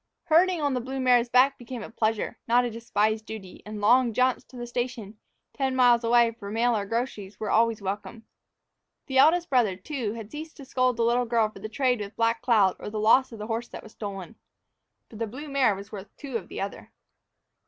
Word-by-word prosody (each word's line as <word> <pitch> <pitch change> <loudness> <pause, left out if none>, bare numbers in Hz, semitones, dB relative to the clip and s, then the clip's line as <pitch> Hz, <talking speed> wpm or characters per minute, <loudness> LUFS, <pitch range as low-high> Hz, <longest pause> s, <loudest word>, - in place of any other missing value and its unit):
Herding 350 +2 +3
on 285 -2 +1
the 250 - -1
blue 265 +2 -5
mare's 245 -2 +3
back 260 +3 +4
became 240 -1 -7
a - - -9
pleasure, 220 -2 -1
not 245 +2 +4
a 240 - -3
despised 220 -1 0
duty, 200 -4 -9
and 210 0 -6
long 235 +3 +4
jaunts 255 +2 +1
to 255 - -14
the 240 - -5
station, 240 -4 -4 0.3
ten 265 -2 -1
miles 245 -2 +5
away, 235 0 +4
for 220 -3 -9
mail 230 +3 +1
or 200 -2 -2
groceries, 220 -3 -4
were 215 - -3 0.3
welcomed. 205 +3 -5 0.8
The 265 -2 +1
eldest 340 +3 +4
brother, 235 -8 +3
too, 220 +2 -4
had 225 -2 -9
ceased 315 +2 -8
to 280 - -10
scold 255 -2 +1
the 235 - +1
little 240 +1 +2
girl 225 -2 +2
for 215 - -13
the 215 +2 -6
trade 250 0 +1
with 205 0 -7
Black 230 0 +1
Cloud 215 -7 +3
or - - -9
for - - -4
the 215 0 -4
loss 250 +5 +4
of 225 - -9
the 210 - -6
horse 230 +2 -3
that - - -10
was 220 - -13
stolen. 200 -1 -7 0.7
For 220 - -12
the 230 0 -2
blue 260 +8 -8
mare 270 -7 +2
was 200 +1 -10
worth 205 -1 -8
two 275 -4 -7
of 195 -6 -3
the - - -6
other. 195 - -6
235 Hz, 220 wpm, -26 LUFS, 215-255 Hz, 0.8 s, miles